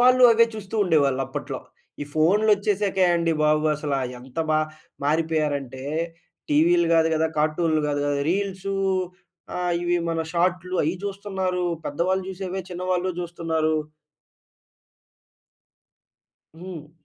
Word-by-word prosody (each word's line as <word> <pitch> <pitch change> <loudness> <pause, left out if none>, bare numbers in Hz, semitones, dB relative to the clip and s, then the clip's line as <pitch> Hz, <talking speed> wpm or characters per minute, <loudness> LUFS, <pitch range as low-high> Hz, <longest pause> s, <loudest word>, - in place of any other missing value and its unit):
వాళ్ళు 255 +1 +6
అవే 230 +1 +5
చూస్తూ 210 0 -8
ఉండేవాళ్ళు 140 -7 +2
అప్పట్లో. - - -5 0.4
ఈ - - -3
ఫోన్‌లోచ్చేశాకే 200 +2 +3
అండి 170 -1 +1
బాబు, 150 0 +3
అసల 145 -1 -2 0.2
ఎంత 125 +4 -11
బా 155 - +4 0.5
మారిపోయారంటే, 150 -4 0 0.7
టీవీలు 170 +3 +4
గాదు 165 0 +4
గదా, 160 +1 +2
కార్టూన్‌లు 155 +1 +2
గాదు 145 -1 0
గదా, 145 0 0
రీల్సూ 195 0 -2 0.8
ఆహ్, 180 -1 0
ఇవి 175 0 +1
మన 165 0 -1
షార్ట్‌లు 180 +1 0
అయి 160 - 0
జూస్తన్నారు. 190 -2 -2 0.2
పెద్దవాళ్ళు 185 +6 0
జూసేవే 190 0 -4
చిన్నవాళ్ళు 180 +1 -1
జూస్తన్నారు. 165 -2 -1 2.8
హ్మ్. 170 -4 -8
175 Hz, 110 wpm, -24 LUFS, 155-190 Hz, 2.8 s, వాళ్ళు